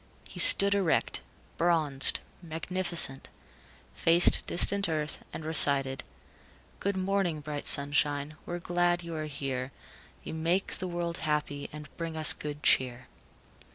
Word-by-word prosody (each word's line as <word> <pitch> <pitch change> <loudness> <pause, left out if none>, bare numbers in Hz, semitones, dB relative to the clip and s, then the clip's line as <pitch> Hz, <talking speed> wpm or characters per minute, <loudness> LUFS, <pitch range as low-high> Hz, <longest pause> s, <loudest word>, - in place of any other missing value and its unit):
He - - -10
stood 200 0 +8
erect, 195 -5 -1 0.4
bronzed, 155 -6 +1 0.2
magnificent, 170 -3 -2 0.6
faced 170 +1 +6
distant 200 +2 +2
Earth, 155 -1 -5
and 155 - -8
recited: 140 -4 +1 0.8
"Good 200 -1 -3
morning, 190 -4 -2
bright 145 -1 -6
sunshine, 145 +1 0
We're 175 - -5
glad 175 0 -1
you 170 0 -8
are 155 -1 -5
here. 135 -2 -6 0.5
You - - -8
make 170 +4 -2
the 185 - -5
world 170 -1 -5
happy, 150 -2 -4
And 150 0 -10
bring 165 -1 -6
us 155 -1 +4
good 150 0 -9
cheer." 125 -1 0
160 Hz, 125 wpm, -27 LUFS, 145-175 Hz, 0.8 s, stood